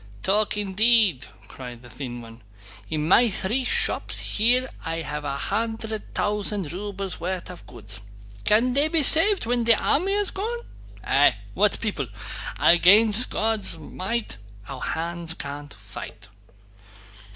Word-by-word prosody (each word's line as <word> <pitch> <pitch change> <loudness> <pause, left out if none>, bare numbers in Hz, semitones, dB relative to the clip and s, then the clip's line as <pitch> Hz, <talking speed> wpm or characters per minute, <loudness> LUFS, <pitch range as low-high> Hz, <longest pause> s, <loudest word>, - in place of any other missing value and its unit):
"Talk 210 +2 +1
indeed!" 210 - +3 0.2
cried 125 -2 -10
the 120 - -13
thin 120 -2 -7
one. 115 0 -14 0.5
"In 155 0 -2
my 235 +7 +5
three 220 +6 -1
shops - - 0
here 245 +4 +1 0.2
I 165 0 -3
have 150 -1 -5
a 140 -1 -3
hundred 220 +4 -3
thousand 205 -5 -2
rubles' 195 -1 -5
worth 180 +1 -4
of 180 - -13
goods. 105 -5 -6 0.4
Can 235 +4 +2
they 285 +3 +4
be 315 -1 +1
saved 370 - +6
when 240 0 0
the 230 0 +6
army 365 - +1
has 410 -1 0
gone? 460 +5 -4 0.4
Eh, - - +4 0.2
what - - +2
people! - - -3 0.5
'Against 210 +7 +5
God's 220 -5 0
might 190 - -5 0.3
our 135 -2 -8
hands 170 0 -2
can't 145 -1 -7
fight. 100 0 -10
200 Hz, 135 wpm, -24 LUFS, 150-230 Hz, 0.5 s, saved